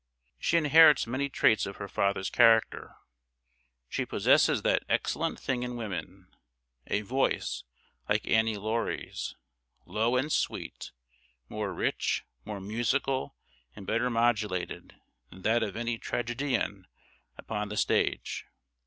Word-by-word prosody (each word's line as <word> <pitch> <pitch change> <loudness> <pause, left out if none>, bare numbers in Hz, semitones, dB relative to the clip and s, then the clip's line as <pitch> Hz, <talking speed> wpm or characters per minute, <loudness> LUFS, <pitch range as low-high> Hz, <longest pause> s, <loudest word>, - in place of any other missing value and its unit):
She 170 - +2
inherits 155 -1 +7
many 130 +4 -2
traits 110 -6 +3
of 100 - -7
her 100 - -6
father's 100 -1 0
character. 115 -2 +3 0.9
She - - -2
possesses - - +3
that - - +3
"excellent - - 0
thing 125 -2 -2
in 125 0 -4
woman," 95 -4 -6 0.5
a 105 - 0
voice, 125 - -1 0.4
like - - +1
Annie 110 -1 +2
Laurie's, 110 +3 -3 0.5
low 115 +3 0
and 135 +5 0
sweet - - -2 0.6
more - - -3
rich, - - -1 0.2
more 105 -2 -5
musical, 130 +7 -1 0.4
and 95 - -10
better 120 +5 +1
modulated, 110 -6 -1 0.3
than 95 0 -14
that 115 +2 +3
of 105 -4 -2
any 120 0 -2
tragédienne 120 -5 -2 0.5
upon 105 -2 -4
the 105 - -5
stage. - - 0
115 Hz, 120 wpm, -29 LUFS, 105-125 Hz, 0.9 s, inherits